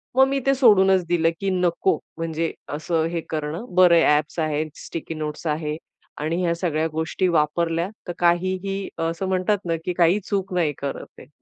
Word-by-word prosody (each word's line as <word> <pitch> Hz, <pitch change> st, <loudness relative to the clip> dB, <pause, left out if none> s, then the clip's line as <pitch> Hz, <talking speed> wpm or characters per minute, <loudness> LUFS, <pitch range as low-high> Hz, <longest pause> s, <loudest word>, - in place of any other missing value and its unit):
मग 265 Hz, +1 st, +6 dB
मी 275 Hz, 0 st, 0 dB
ते 275 Hz, -, +4 dB
सोडूनच 195 Hz, -7 st, +5 dB
दिलं, 165 Hz, -1 st, +2 dB
की 195 Hz, -, -1 dB
नको 180 Hz, -1 st, +1 dB, 0.2 s
म्हणजे 165 Hz, 0 st, -2 dB, 0.2 s
असं 160 Hz, +2 st, 0 dB
हे 170 Hz, -1 st, -2 dB
करणं. 155 Hz, +6 st, -3 dB
बरं 180 Hz, -2 st, +7 dB
आहे 165 Hz, -, +5 dB
ॲप्स 150 Hz, +3 st, -4 dB
आहे, 155 Hz, -1 st, 0 dB, 0.2 s
स्टिकी 165 Hz, 0 st, -5 dB
नोट्स 155 Hz, +1 st, -5 dB
आहे. 150 Hz, 0 st, -2 dB, 0.4 s
आणि 160 Hz, +4 st, -1 dB
ह्या 170 Hz, -1 st, +1 dB
सगळ्या 160 Hz, -2 st, 0 dB
गोष्टी 160 Hz, +4 st, 0 dB
वापरल्या, 165 Hz, +2 st, +1 dB, 0.2 s
तर 175 Hz, -, -3 dB
काहीही 185 Hz, +3 st, 0 dB, 0.2 s
असं 170 Hz, +3 st, -3 dB
म्हणतात 190 Hz, +2 st, +1 dB
ना, 165 Hz, -1 st, 0 dB
की 180 Hz, -, -1 dB
काही 175 Hz, +3 st, +4 dB
चूक 195 Hz, -2 st, -2 dB
नाही 165 Hz, -5 st, +1 dB
करत 140 Hz, -1 st, -4 dB
आहे. -, -, -13 dB
170 Hz, 180 wpm, -23 LUFS, 160-185 Hz, 0.4 s, बरं